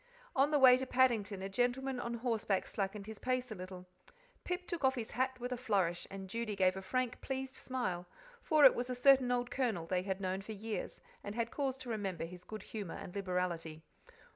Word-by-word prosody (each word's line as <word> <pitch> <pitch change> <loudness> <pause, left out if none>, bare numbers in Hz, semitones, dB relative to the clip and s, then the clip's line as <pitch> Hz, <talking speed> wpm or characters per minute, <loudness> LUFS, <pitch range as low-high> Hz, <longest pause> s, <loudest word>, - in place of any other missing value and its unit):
On 275 +2 +4
the 300 - +3
way 255 -2 +8
to 260 - -3
Paddington 220 -7 +2
a - - -2
gentleman 245 +5 0
on 235 -1 -3
horseback 225 -5 0
slackened 200 0 -3 0.2
pace 255 -1 -1
a - - -1
little. 185 -1 -8 0.6
Pip 360 0 -3
took 345 -5 -4
off 265 0 +4
his 230 -3 -4
hat 260 +2 0
with 245 +1 -4
a 250 - -1
flourish, 190 -8 0
and 195 -1 -7
Judy 220 +1 -3
gave 185 -1 +3
a 190 - -4
frank, 250 +5 -1
pleased 265 0 -3
smile, 185 -11 -3 0.3
for 305 -3 +5
it 265 - +10
was 245 +1 -3
a 250 - -1
certain 260 0 +5
old 245 0 0
Colonel 225 -11 0
they 180 +2 0
had 190 0 -2
known 190 0 -2
for 220 +3 -7
years, 215 +1 -5 0.2
and 205 +1 -5
had 230 -1 -1
cause 270 -2 -1
to 260 -2 -8
remember 195 -6 -2
his 180 +1 -10
good 215 +1 -7
humour 205 -6 -6
and 180 - -8
liberality. 180 -5 -2
225 Hz, 210 wpm, -35 LUFS, 190-255 Hz, 0.6 s, it